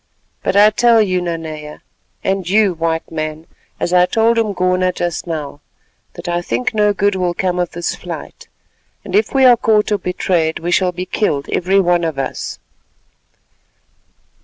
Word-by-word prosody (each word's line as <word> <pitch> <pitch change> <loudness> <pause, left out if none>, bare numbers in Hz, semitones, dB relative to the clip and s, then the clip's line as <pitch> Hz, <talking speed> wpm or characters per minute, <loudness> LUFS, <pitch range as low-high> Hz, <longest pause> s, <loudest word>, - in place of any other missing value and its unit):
But - - -1
I 210 +1 +6
tell 235 +1 +4
you, 185 -4 +1
Nanea, 160 -3 -6 0.4
and 190 -2 -1
you, 205 -1 +3
White 165 0 -2
Man, 155 0 -4 0.3
as 175 - -1
I 180 0 +5
told 230 +2 +2
Umgona 185 -4 +1
just 175 -1 -3
now, 150 -3 -5 0.5
that - - -9
I 175 0 0
think 245 +8 -2
no 210 -1 +3
good 205 0 +1
will 180 -2 -1
come 180 -1 -1
of 175 -1 -2
this 170 0 -2
flight, - - -9 0.6
and - - -4
if 425 - +2
we 265 -1 +5
are 250 -1 +8
caught 215 -2 +1
or 205 - +1
betrayed, 175 -3 0
we 175 +2 -3
shall 180 0 +2
be 180 +1 -5
killed 150 -8 -1
every 190 +2 +2
one 175 -2 +2
of 160 -4 -2
us." 135 -1 -4
180 Hz, 165 wpm, -17 LUFS, 165-205 Hz, 0.6 s, are